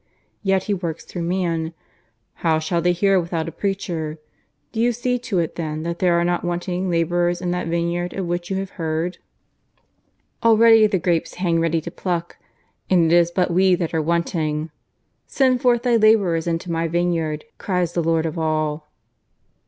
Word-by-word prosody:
Yet 195 -2 +1
He 205 - -1
works 170 -4 -4
through 175 - -6
man. 170 -2 -1 0.6
'How 160 -2 +1
shall 160 +2 -1
they 175 +1 +3
hear 195 +2 +3
without 165 -2 -3
a - - -4
preacher?' 170 -5 -3 0.5
Do 225 - -5
you 240 +1 +3
see 250 +2 -1
to 230 -5 -3
it 170 -2 -1
then 155 -2 -3
that 170 +1 -4
there 175 -2 +3
are - - +1
not 175 0 0
wanting 175 +1 -2
labourers 175 +1 +1
in 180 -1 -2
that 180 -1 -2
vineyard 170 +1 -1
of 190 - -2
which 175 0 -3
you 190 - -1
have 195 0 -4
heard. 160 +3 -2 1.2
Already 225 -1 +6
the 205 -2 0
grapes 170 -1 -1
hang 175 -2 +1
ready 165 0 +1
to - - -7
pluck, 175 -2 -3 0.5
and 170 -3 +4
it - - +6
is 170 -1 +4
but 180 0 0
we 185 +1 +4
that 170 -2 -3
are 160 - +1
wanting.... 160 -1 -1 0.6
Send 255 -2 +2
forth 240 -2 +3
then 240 -2 +3
labourers 195 -7 +3
into 170 +1 -2
My 165 0 0
vineyard, 165 -2 -1
cries 180 -3 -1
the 175 - 0
Lord 165 0 +1
of 160 +1 -3
all." 155 -1 -1
175 Hz, 180 wpm, -21 LUFS, 165-190 Hz, 1.2 s, Already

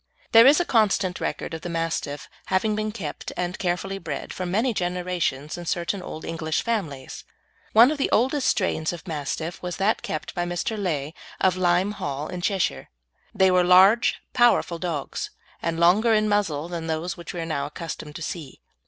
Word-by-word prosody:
There 230 +2 +9
is 290 +4 +7
constant 200 -5 +2
record - - -3
of 160 - -5
the 175 - -5
Mastiff 165 -3 -3 0.2
having 210 +3 +1
been 215 0 -2
kept 180 -10 -6
and 180 +1 -2
carefully 195 +2 -2
bred 150 -6 -5
for 185 - -4
many 225 +7 +1
generations 175 -5 -2
in 175 - -8
certain 175 +3 -1
old 160 -3 -7
English 160 -2 -2
families. 160 - -3 0.5
One 235 +5 +8
of 305 - -3
the 275 - +1
oldest 265 +4 +2
strains 175 -5 +1
of 175 +2 -10
Mastiffs 160 +2 -4
was 180 -1 -4
that 200 +3 +1
kept 155 - -4
by 175 - -1
Mr. 175 +5 -2
Legh, 160 -7 -2 0.3
of 185 -2 +3
Lyme 185 +2 +2
Hall, 145 -7 -4
in 180 -1 -5
Cheshire. 185 - -1 0.5
They 190 -1 +5
were 180 0 +4
large, 190 +6 +6 0.2
powerful 240 -8 +3
dogs, 165 -6 -3 0.3
and 165 0 -2
longer 210 +7 +5
in 215 0 +2
muzzle 195 -8 0
than 170 -2 -5
those 160 +2 -2
which 170 0 -8
we - - -3
are - - -3
now 145 -3 -2
accustomed 150 -1 -7
to 165 - -5
see. 155 -5 -6
175 Hz, 180 wpm, -24 LUFS, 160-200 Hz, 0.5 s, There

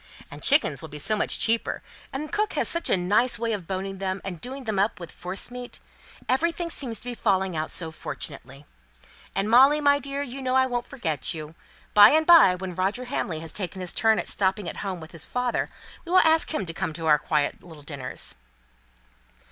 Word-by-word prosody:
And - - -9
chickens 210 - +4
will 160 - -9
be 150 - -8
so 215 +9 +1
much 210 - +1
cheaper, 230 0 0 0.3
and 300 +3 -5
cook 425 0 0
has - - 0
such 335 - 0
a - - +4
nice 205 +8 +2
way 230 -1 -1
of 190 -6 -5
boning 195 0 -4
them, 190 0 -2
and 180 -4 -6
doing 265 +2 -6
them 215 -5 -2
up 200 0 +1
with 170 -2 -8
forcemeat. 245 +7 -5 0.5
Everything 335 +5 0
seems 240 -8 +1
to - - -12
be 245 - -4
falling 190 -5 0
out 155 0 -2
so 165 -2 -2
fortunately. 140 -2 -7 0.7
And 195 +2 0
Molly, 265 +6 +6
my 285 -1 +4
dear, 280 +1 -4
you 270 0 -7
know 255 0 -1
I 260 0 +5
won't 245 -2 -3
forget 165 - -3
you. 155 0 -8 0.4
By 205 0 +9
and 315 +1 +3
by, 320 - +7
when 180 0 -6
Roger 195 +8 -1
Hamley 180 - -3
has 160 -1 -7
taken 190 -2 -4
his 180 -1 -5
turn 220 -1 +3
at - - -3
stopping 190 0 0
at - - -5
home 190 -4 -4
with 160 - -11
his 165 - -4
father, 250 -1 -1 0.3
we 345 - -8
will 370 - +5
ask 320 0 +4
him 305 -11 -2
to 165 - -6
one - - -2
of 160 +1 -8
our - - -4 0.2
little - - -25
quiet 150 +1 -2
dinners." 140 -4 -6
205 Hz, 210 wpm, -25 LUFS, 175-260 Hz, 0.7 s, By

